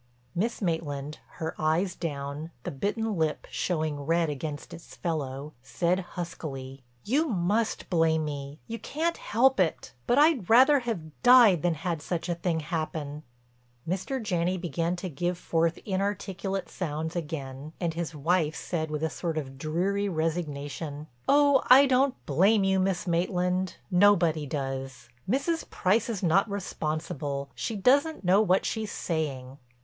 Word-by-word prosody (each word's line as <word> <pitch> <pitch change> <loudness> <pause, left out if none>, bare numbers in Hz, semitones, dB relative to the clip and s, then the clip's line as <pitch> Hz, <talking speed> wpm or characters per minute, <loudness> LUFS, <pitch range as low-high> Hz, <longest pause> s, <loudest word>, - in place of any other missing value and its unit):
Miss 220 +4 -1
Maitland, 150 -4 -2
her 160 0 -4
eyes 165 +4 +1
down, 145 -1 -4
the - - -4
bitten 210 - -1
lip 160 -3 -1
showing 155 -4 -1
red 165 +2 +1
against 145 +1 -6
its 165 - -11
fellow, 150 -3 -3
said 170 +7 0 0.2
huskily: 140 -6 -6 0.2
"You 290 +9 +1
must 210 - 0
blame 160 -2 +2
me—you 145 +9 -6
can't 330 +3 -1
help 260 +2 +2
it—but 170 - 0
I'd 290 - +4
rather 265 +5 +7
have 180 - -5
died 240 - +7
than 175 -2 +1
had 165 0 -3
such 175 +2 -3
a - - +2
thing 170 -1 -1
happen." 155 -2 -4 0.7
Mr. 195 +10 -2
Janney 185 -4 0
began 170 0 -1
to 180 +1 -5
give 175 +3 -2
forth 165 -1 0
inarticulate 195 -1 -2
sounds 160 -1 -4
again 150 -3 -5
and 170 -3 -1
his 165 -1 -4
wife 155 +1 +1
said 160 -3 -3
with 150 0 -3
a - - +3
sort 165 -2 -3
of 135 -3 -5
dreary 190 +7 0
resignation: 155 -3 -3 0.2
"Oh, 285 -1 +5
I 265 +3 +9
don't 265 0 +3
blame 195 +9 +4
you, 190 0 +2
Miss 185 -1 0
Maitland. 180 +1 0 0.2
Nobody 175 -5 +4
does. 135 -3 -4 0.2
Mrs. 325 - 0
Price 210 +5 +1
is 205 -4 -3
not 190 +5 +3
responsible; 150 -7 -3
she 225 - -3
doesn't 280 +9 +3
know 190 +3 +5
what 190 -3 +2
she's 220 -2 -2
saying." 140 -5 -3
170 Hz, 145 wpm, -28 LUFS, 155-200 Hz, 0.7 s, I